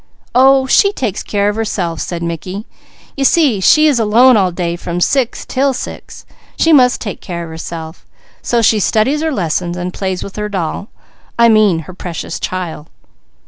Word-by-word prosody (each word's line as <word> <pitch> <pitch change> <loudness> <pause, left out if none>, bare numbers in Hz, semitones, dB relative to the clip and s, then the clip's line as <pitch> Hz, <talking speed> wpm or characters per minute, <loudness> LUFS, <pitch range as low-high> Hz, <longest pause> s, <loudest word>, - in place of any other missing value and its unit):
"Oh 265 +2 +5
she 400 +9 +4
takes 235 - -3
care 205 -1 -1
of 205 - 0
herself," 190 -7 -3
said 170 -1 -4
Mickey. 180 +5 -5 0.5
"You 275 - -2
see 275 - +3
she 305 +11 +5
is 290 -6 +3
alone 235 +4 +5
all 190 -4 +2
day 170 -1 -3
from 175 0 -5
six 255 +5 0
'til 270 +1 0
six; 250 - -8 0.3
she 325 - +3
must 250 -4 +4
take 205 - -6
care 170 -1 -5
of 165 - -9
herself, 160 0 -8 0.4
so 235 -1 0
she 215 0 +4
studies 240 +9 +1
her 320 0 -1
lesson, 175 - -2
and 180 0 -4
plays 190 -2 -3
with 200 - -9
her 210 0 -3
doll 190 0 -4 0.5
I 235 0 +5
mean 210 -7 +3
her 185 +4 -11
Precious 175 -2 -6
Child." 170 -4 -5
205 Hz, 180 wpm, -15 LUFS, 175-250 Hz, 0.5 s, Oh